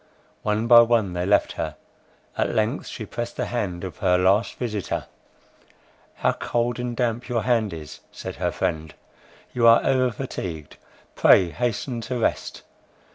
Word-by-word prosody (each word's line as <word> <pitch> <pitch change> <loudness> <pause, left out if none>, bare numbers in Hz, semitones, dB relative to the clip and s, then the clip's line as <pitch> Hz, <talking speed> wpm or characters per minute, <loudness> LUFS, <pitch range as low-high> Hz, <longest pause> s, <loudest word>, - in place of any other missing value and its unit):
One 105 +1 0
by 120 0 +8
one 115 -5 +2
they 90 +1 -2
left 100 - +3
her—at - - -6
length 110 +6 0
she 110 - -6
pressed 120 +2 -5
the - - -1
hand 100 -7 -3
of 90 -4 -6
her 90 -3 +3
last 95 +5 +2
visitor. 105 -6 -3 1.1
"How - - +1
cold 120 +1 -2
and 120 -1 -4
damp 120 0 -1
your 120 -2 0
hand 115 -4 +1
is," 80 -3 -9
said - - -7
her - - -1
friend; 80 0 -3 0.6
"you 120 -1 +3
are 115 0 +6
over 130 -1 +3
fatigued, 90 - -6 0.4
pray 90 -3 +5
hasten 120 - -2
to 125 +2 -4
rest." 115 - -2
115 Hz, 150 wpm, -24 LUFS, 95-120 Hz, 1.1 s, by